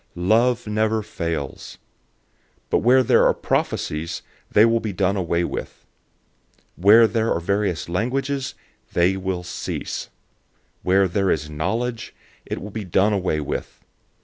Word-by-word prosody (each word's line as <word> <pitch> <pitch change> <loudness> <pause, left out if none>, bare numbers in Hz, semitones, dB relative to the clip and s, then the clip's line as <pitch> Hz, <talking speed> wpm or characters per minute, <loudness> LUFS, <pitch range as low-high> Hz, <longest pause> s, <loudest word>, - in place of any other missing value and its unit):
013:008 90 +1 -3
Love 120 +3 +3
never 110 +1 0
fails. 85 -8 -5 0.9
But - - +4
where 130 +3 +5
there - - +4
are - - +2
prophecies, 80 +2 -2 0.3
they 105 - +6
will 115 0 +3
be 110 -2 -3
done 95 +1 0
away 85 -2 0
with. - - -6 0.9
Where 105 +6 +7
there 110 +1 0
are - - +1
various 100 0 -1
languages, 130 +9 -2 0.4
they 90 +2 +3
will 95 -2 -3
cease. 90 - -5 0.7
Where 95 +1 +3
there 95 +2 0
is 75 -2 -1
knowledge, 115 +10 -3 0.3
it - - -3
will 105 - -8
be 110 +1 -5
done 95 +3 +2
away 90 -6 0
with. 70 - -6
100 Hz, 140 wpm, -22 LUFS, 90-110 Hz, 0.9 s, Where